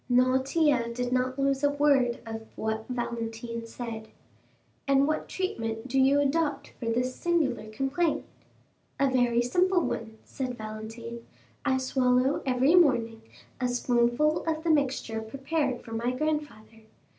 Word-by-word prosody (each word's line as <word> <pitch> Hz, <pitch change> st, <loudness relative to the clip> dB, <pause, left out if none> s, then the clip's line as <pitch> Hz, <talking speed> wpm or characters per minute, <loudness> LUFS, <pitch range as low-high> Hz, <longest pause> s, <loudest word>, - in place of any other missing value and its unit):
Noirtier 255 Hz, +1 st, +3 dB
did 245 Hz, +1 st, -2 dB
not 255 Hz, +1 st, 0 dB
lose 275 Hz, 0 st, +1 dB
a 285 Hz, -, +5 dB
word 280 Hz, -4 st, +3 dB
of 225 Hz, 0 st, -7 dB
what 220 Hz, 0 st, -3 dB
Valentine 230 Hz, -1 st, -4 dB
said. 225 Hz, -2 st, -6 dB, 0.8 s
"And 275 Hz, 0 st, +4 dB
what 310 Hz, -, -2 dB
treatment 225 Hz, -10 st, -3 dB
do 265 Hz, +1 st, +1 dB
you 270 Hz, +2 st, +5 dB
adopt 290 Hz, +2 st, 0 dB
for 235 Hz, -, -4 dB
this 250 Hz, +2 st, 0 dB
singular 295 Hz, -11 st, 0 dB
complaint?" 270 Hz, +8 st, 0 dB, 0.7 s
"A 275 Hz, -1 st, +3 dB
very 240 Hz, -2 st, +3 dB
simple 360 Hz, +8 st, +2 dB
one," 220 Hz, -6 st, -4 dB
said 255 Hz, -2 st, -4 dB
Valentine. 225 Hz, +2 st, -7 dB, 0.4 s
"I 265 Hz, -2 st, +2 dB
swallow 260 Hz, +1 st, +2 dB
every 260 Hz, +4 st, +3 dB
morning 235 Hz, -10 st, +3 dB, 0.4 s
a 250 Hz, -, +1 dB
spoonful 245 Hz, +4 st, +2 dB
of 320 Hz, -1 st, -1 dB
the 335 Hz, -, +2 dB
mixture 265 Hz, -6 st, 0 dB
prepared 270 Hz, +3 st, -2 dB
for 230 Hz, -, -11 dB
my 230 Hz, +2 st, -1 dB
grandfather. 255 Hz, -6 st, -3 dB
255 Hz, 135 wpm, -28 LUFS, 230-285 Hz, 0.8 s, a